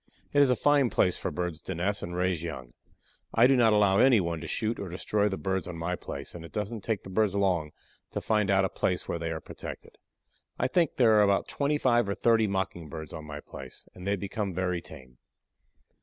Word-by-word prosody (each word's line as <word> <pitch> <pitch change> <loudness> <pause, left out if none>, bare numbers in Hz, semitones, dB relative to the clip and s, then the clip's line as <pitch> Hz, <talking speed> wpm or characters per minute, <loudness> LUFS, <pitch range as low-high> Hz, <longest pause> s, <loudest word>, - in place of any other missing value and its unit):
It 145 - +5
is 140 - +5
a 125 - +4
fine 145 -1 +3
place 90 - +2
for - - -2
birds 85 0 -4
to 95 - -5
nest 100 +4 -1
and 85 0 -5
raise 90 -2 0
young. 65 -8 -6 0.6
I 115 - +6
do 135 +1 +5
not 120 -3 +5
allow 100 -2 +4
any 125 -3 +6
one 85 -3 -2
to - - -6
shoot 115 +1 -1
or 100 - -5
destroy 105 +4 0
the 95 - -3
birds 95 -2 -2
on 90 -2 -6
my 85 +2 -2
place, 70 -5 -7
and 85 - -8
it 85 - -11
doesn't 105 +1 -4
take 110 0 -2
the 95 - -9
birds 105 0 +1
long 90 -6 +1 0.4
to - - -3
find 105 -2 +1
out 95 -1 +4
a - - -1
place 90 -1 -1
where 85 - -2
they 85 0 -3
are 80 -1 -3
protected. - - -9 0.6
I - - +1
think 170 -4 +1
there 110 -4 +5
are - - +6
about 100 -1 +3
twenty 145 +1 0
five 120 -6 +2
or 100 - -1
thirty 115 -2 +3
Mocking 95 -4 -3
birds 80 +1 -7
on 80 - -7
my 75 -1 -7
place, - - -10
and 90 +1 -9
they 100 - +2
become 100 -1 -4
very 90 -1 -1
tame. 65 -7 -13
95 Hz, 230 wpm, -28 LUFS, 85-110 Hz, 0.6 s, I